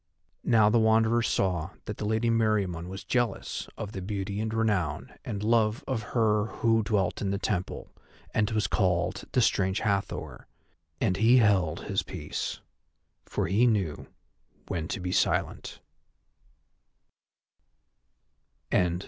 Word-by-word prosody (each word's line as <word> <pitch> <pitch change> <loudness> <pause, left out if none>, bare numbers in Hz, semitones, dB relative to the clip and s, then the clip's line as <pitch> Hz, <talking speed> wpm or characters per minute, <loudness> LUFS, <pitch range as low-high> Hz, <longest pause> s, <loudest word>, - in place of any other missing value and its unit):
Now 110 -3 +5
the 115 +2 +4
Wanderer 110 +1 +4
saw 90 -7 0 0.2
that 105 - -5
the 105 - -4
Lady 110 +2 +1
Meriamun 100 -7 +1
was 95 +1 -7
jealous 120 -5 -1
of 105 -2 -5
the 95 - -6
beauty 100 +1 -3
and 110 0 -2
renown 105 -9 -1
and 100 -1 -4
love 110 +3 +2
of 130 -4 -1 0.2
her 105 -2 +3
who 115 +2 +1
dwelt 100 -3 0
in 100 - -1
the 100 - 0
temple, 95 -3 -3 0.4
and 105 -1 +2
was 110 -3 0
called 90 +1 0
the 125 - +4
Strange 95 -2 +1
Hathor, 100 -3 -2 0.5
and 90 - +1
he 115 +4 +5
held 100 -8 +3
his - - -1
peace, - - -5 0.7
for - - -1
he 105 +8 +3
knew 95 -10 0 0.6
when 80 -2 -3
to - - -3
be 90 0 -3
silent. - - 0
105 Hz, 130 wpm, -28 LUFS, 95-110 Hz, 0.7 s, Now